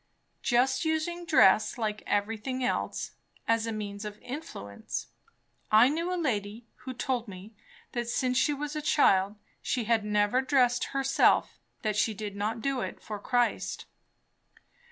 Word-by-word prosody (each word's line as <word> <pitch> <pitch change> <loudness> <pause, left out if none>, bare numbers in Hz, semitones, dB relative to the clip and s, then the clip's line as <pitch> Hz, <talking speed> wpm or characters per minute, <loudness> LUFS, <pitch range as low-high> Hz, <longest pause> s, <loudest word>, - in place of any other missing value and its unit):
"Just 260 +2 +2
using 335 +2 -1
dress 215 -7 +5
like 215 -2 -2
everything 225 +5 -1
else, 250 - -1 0.4
as 230 0 +2
a - - -1
means 205 -1 -5
of 210 -1 -6
influence. 175 - -6 0.6
I 220 +4 +7
knew 335 +4 -1
a 365 - -1
lady 225 - -2
who 260 - -7
told 245 -2 -1
me 195 +2 -10 0.4
that 240 -1 -3
since 255 +1 0
she 280 - +3
was 295 +1 -4
a 305 - -2
child, 200 -9 +3 0.3
she 245 - -1
had 225 -1 +2
never 210 +4 +2
dressed 255 -2 +2
herself 275 0 +2 0.2
that 215 -1 0
she 215 +1 +1
did 205 0 -5
not 215 +3 -2
do 275 -1 0
it - - -5
for 210 -1 -6
Christ." 245 +3 0
235 Hz, 150 wpm, -29 LUFS, 210-270 Hz, 0.6 s, I